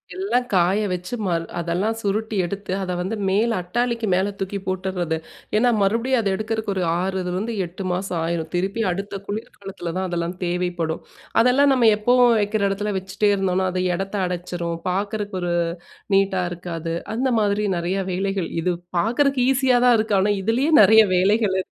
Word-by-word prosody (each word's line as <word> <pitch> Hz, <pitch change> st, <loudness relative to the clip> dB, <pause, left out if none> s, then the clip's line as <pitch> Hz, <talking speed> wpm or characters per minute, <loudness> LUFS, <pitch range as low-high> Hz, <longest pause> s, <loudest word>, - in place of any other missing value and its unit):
எல்லாம் 370 Hz, -10 st, 0 dB
காய 185 Hz, +2 st, +3 dB
வச்சு 180 Hz, +5 st, -3 dB
ம -, -, -1 dB, 0.3 s
அதெல்லாம் 180 Hz, +6 st, -1 dB
சுருட்டி 215 Hz, +1 st, -2 dB
எடுத்து 195 Hz, +1 st, -5 dB
அதை 180 Hz, -1 st, -3 dB
வந்து 190 Hz, +5 st, -2 dB
மேல 215 Hz, +5 st, +2 dB
அட்டாளிக்கு 235 Hz, +4 st, -1 dB
மேல 190 Hz, +3 st, +1 dB
தூக்கி 195 Hz, +1 st, -3 dB
போட்டுறது. 185 Hz, -3 st, -2 dB, 0.4 s
ஏன்னா, 245 Hz, +3 st, +4 dB
மறுபடியும் 230 Hz, +6 st, +2 dB
அத 205 Hz, -, -2 dB
எடுக்கிறதுக்கு 220 Hz, -1 st, -2 dB
ஒரு 185 Hz, -, 0 dB, 0.2 s
ஆறுலயிருந்து, 190 Hz, +3 st, -2 dB
8 180 Hz, +3 st, -8 dB
மாதம் 180 Hz, 0 st, -2 dB
ஆயிரும் 165 Hz, -1 st, -2 dB
திருப்பி 195 Hz, +5 st, -1 dB
அடுத்த 195 Hz, +2 st, -4 dB
குளிர்காலத்தில 195 Hz, -4 st, -6 dB
தான் 190 Hz, -, -1 dB
அதெல்லாம் 170 Hz, +1 st, -2 dB
தேவைப்படும். 175 Hz, -2 st, -2 dB, 0.4 s
அதெல்லாம் 270 Hz, +4 st, +4 dB
நம்ம 240 Hz, -3 st, +5 dB
எப்பவும் 245 Hz, +1 st, +4 dB
வைக்கிற 205 Hz, +1 st, -1 dB
இடத்துல 205 Hz, +1 st, -2 dB
வச்சிட்டே 190 Hz, +2 st, 0 dB
இருந்தோம்னா. 190 Hz, -1 st, 0 dB
அது 185 Hz, -, 0 dB
இடத்தை 195 Hz, +3 st, -3 dB
அடைச்சிடும், 175 Hz, -1 st, -3 dB
பார்க்கறதுக்கு 200 Hz, +1 st, -2 dB
ஒரு 175 Hz, -1 st, -1 dB, 0.6 s
நீட்டா 195 Hz, -1 st, +2 dB
இருக்காது. 170 Hz, -1 st, -5 dB, 0.2 s
அந்த 260 Hz, +3 st, 0 dB
மாதிரி 210 Hz, 0 st, +1 dB
நிறையா 180 Hz, +3 st, -1 dB
வேலைகள், 195 Hz, -1 st, -1 dB
இது 180 Hz, +1 st, +1 dB, 0.3 s
பார்க்கறதுக்கு 250 Hz, +5 st, +2 dB
ஈஸியா 260 Hz, -2 st, +3 dB
தான் 245 Hz, -, +6 dB
இருக்கு. 215 Hz, -1 st, +1 dB
ஆனா, 205 Hz, -, +2 dB
இதுலயே 250 Hz, +9 st, +1 dB
நிறையா 220 Hz, +2 st, +7 dB
வேலைகள் 200 Hz, +1 st, +2 dB
இ -, -, -8 dB
195 Hz, 155 wpm, -22 LUFS, 180-220 Hz, 0.6 s, நிறையா